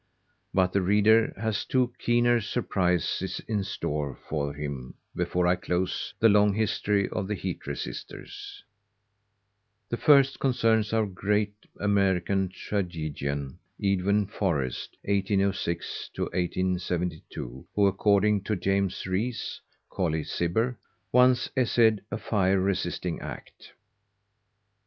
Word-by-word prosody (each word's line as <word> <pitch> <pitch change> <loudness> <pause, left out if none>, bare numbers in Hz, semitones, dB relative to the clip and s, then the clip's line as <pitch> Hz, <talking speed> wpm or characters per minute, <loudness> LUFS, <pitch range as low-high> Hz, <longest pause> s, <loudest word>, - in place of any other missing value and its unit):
But 95 -1 +2
the 100 - +3
reader 105 +4 +4
has 110 0 -1
two 125 -2 +1
keener 120 0 +3
surprises 90 -6 0
in 105 -3 0
store 75 -6 -3
for 70 -2 -1
him 70 -3 -6 0.2
before 90 0 0
I 90 +1 +4
close 90 +1 -2
the 115 - +6
long 105 -1 +4
history 105 -2 +1
of 95 - -3
the 105 - -1
heat 95 -2 -5
resisters. - - -7 1.3
The 120 - -2
first 140 -1 +5
concerns 115 -5 +2
our 110 -1 +2
great 105 +2 0 0.3
American 95 -2 +2
tragedian 75 -7 -3 0.2
Edwin 100 0 +2
Forrest 85 - -2
(1806 100 -3 -1
1872) 90 -7 -2
who, 100 - +4
according 100 +1 +3
to 110 - 0
James 95 +1 0
Rees 105 +6 -2 0.3
(Colley 80 -5 0
Cibber), 110 +11 -1 0.3
once 125 0 +5
essayed 115 -4 +3
a - - -3
fire 95 -2 +1
resisting 90 -2 -1
act. - - -10
100 Hz, 110 wpm, -27 LUFS, 90-105 Hz, 1.3 s, the